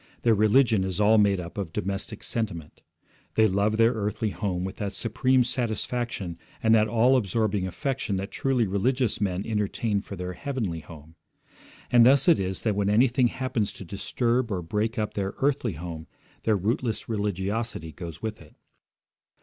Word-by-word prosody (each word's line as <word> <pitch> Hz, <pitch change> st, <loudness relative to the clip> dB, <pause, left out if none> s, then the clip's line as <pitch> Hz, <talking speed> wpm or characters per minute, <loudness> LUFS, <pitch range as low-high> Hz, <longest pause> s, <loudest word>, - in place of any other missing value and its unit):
Their 115 Hz, -, +5 dB
religion 110 Hz, 0 st, +4 dB
is 95 Hz, -1 st, -3 dB
all 105 Hz, +1 st, +5 dB
made 100 Hz, -2 st, +3 dB
up 85 Hz, +3 st, -6 dB
of 95 Hz, -5 st, -4 dB
domestic 100 Hz, +5 st, -4 dB
sentiment. 95 Hz, -9 st, -4 dB, 0.5 s
They 110 Hz, -, +5 dB
love 105 Hz, +2 st, +1 dB
their 115 Hz, +1 st, +4 dB
earthly 105 Hz, -1 st, -2 dB
home 95 Hz, -5 st, -2 dB
with 95 Hz, +1 st, -5 dB
that 100 Hz, 0 st, -3 dB
supreme 125 Hz, +5 st, +2 dB
satisfaction 120 Hz, -6 st, -3 dB, 0.2 s
and 110 Hz, 0 st, +5 dB
that 110 Hz, -1 st, +5 dB
all 120 Hz, +4 st, +4 dB
absorbing 105 Hz, -4 st, 0 dB
affection 130 Hz, -, -2 dB
that 95 Hz, +2 st, -4 dB
truly 130 Hz, -4 st, +1 dB
religious 115 Hz, +5 st, 0 dB
men 95 Hz, -1 st, -1 dB
entertain 105 Hz, -1 st, -1 dB
for 100 Hz, -, -8 dB
their 90 Hz, 0 st, -5 dB
heavenly 110 Hz, -, -3 dB
home. 80 Hz, 0 st, -13 dB, 0.7 s
And 120 Hz, -1 st, +7 dB
thus 135 Hz, +2 st, +5 dB
it 170 Hz, -, +6 dB
is 95 Hz, 0 st, -2 dB
that 110 Hz, -3 st, +1 dB
when 100 Hz, 0 st, +1 dB
anything 120 Hz, +3 st, +4 dB
happens 125 Hz, -4 st, -2 dB
to 95 Hz, -, -10 dB
disturb 120 Hz, +6 st, -1 dB
or 90 Hz, -3 st, -2 dB
break 105 Hz, +6 st, -1 dB
up 105 Hz, -1 st, -1 dB
their 95 Hz, -1 st, -3 dB
earthly 135 Hz, -6 st, 0 dB
home 80 Hz, 0 st, -7 dB, 0.4 s
their 110 Hz, -2 st, +3 dB
rootless 110 Hz, +3 st, -1 dB
religiosity 105 Hz, -3 st, -2 dB
goes 85 Hz, +4 st, -9 dB
with 110 Hz, -1 st, -4 dB
it. -, -, -17 dB
105 Hz, 165 wpm, -26 LUFS, 95-115 Hz, 0.7 s, And